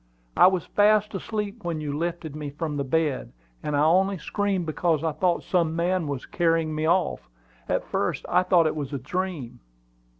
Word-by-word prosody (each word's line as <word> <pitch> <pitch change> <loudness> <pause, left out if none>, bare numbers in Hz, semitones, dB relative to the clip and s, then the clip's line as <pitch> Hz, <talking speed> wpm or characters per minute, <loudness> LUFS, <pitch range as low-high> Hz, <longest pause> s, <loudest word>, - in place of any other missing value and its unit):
"I - - +8
was 185 -2 +1
fast 210 0 +3
asleep 210 +2 -4
when 170 -2 -2
you 150 -2 -3
lifted 165 -1 -3
me 150 -1 -5
from 150 +1 -4
the 140 - -1
bed, 150 0 -1 0.3
and 150 -1 -1
I 145 - +3
only 190 +5 +3
screamed 195 +2 -1
because 160 0 0
I 160 - +1
thought 175 +3 0
some 165 -3 +1
man 175 0 0
was 140 -3 -4
carrying 165 -2 +1
me 155 +1 -1
off. 175 - +1 0.4
At - - +1
first, - - -2
I 180 - +3
thought 180 -2 +4
it 155 - 0
was 145 -2 -4
a - - -1
dream." 155 -1 -4
165 Hz, 190 wpm, -25 LUFS, 150-185 Hz, 0.4 s, I